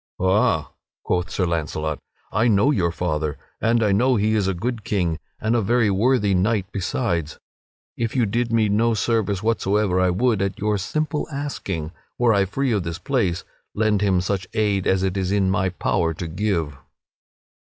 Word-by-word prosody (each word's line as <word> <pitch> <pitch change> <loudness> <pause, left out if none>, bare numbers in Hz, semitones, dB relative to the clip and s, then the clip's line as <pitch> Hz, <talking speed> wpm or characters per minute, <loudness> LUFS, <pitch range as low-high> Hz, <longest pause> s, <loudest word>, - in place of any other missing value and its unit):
"Ha!" 95 -5 +2 0.3
quoth 90 0 -1
Sir 95 - 0
Launcelot, 80 -2 -2 0.3
"I 110 +3 +2
know 105 +5 +4
your 90 -10 +1
father, 75 -3 -2 0.2
and 115 0 +2
I 105 - +2
know 125 +6 +3
that 100 - 0
he 110 +1 +2
is 105 -3 +1
a 95 - 0
good 115 +4 -3
king 85 -7 -1 0.2
and 110 +2 0
a 120 - +2
very 115 0 +2
worthy 105 0 +2
knight 95 +2 +1
besides. 90 - -2 0.6
If 115 0 -2
you 125 -3 +3
did 115 +3 -1
me 115 -2 +3
no 110 +3 +2
service 105 -2 0
whatsoever, 105 -4 +1
I 90 0 +3
would, 110 +3 +1
at 100 -1 -1
your 105 0 0
simple 150 +8 -2
asking, 100 - -4 0.3
were 120 -2 +3
I 100 -1 +3
free 130 +7 -1
of 105 -3 +1
this 85 -1 -4
place, 95 -7 -1 0.3
lend 105 -1 +2
him 95 -3 +2
such 95 0 -2
aid 105 -3 +1
as 95 0 +2
it 95 0 -1
is 95 -1 -1
in 100 -2 +2
my 95 0 +1
power 85 -2 0
to 85 +1 -5
give." 85 -4 -1
100 Hz, 185 wpm, -22 LUFS, 90-115 Hz, 0.6 s, know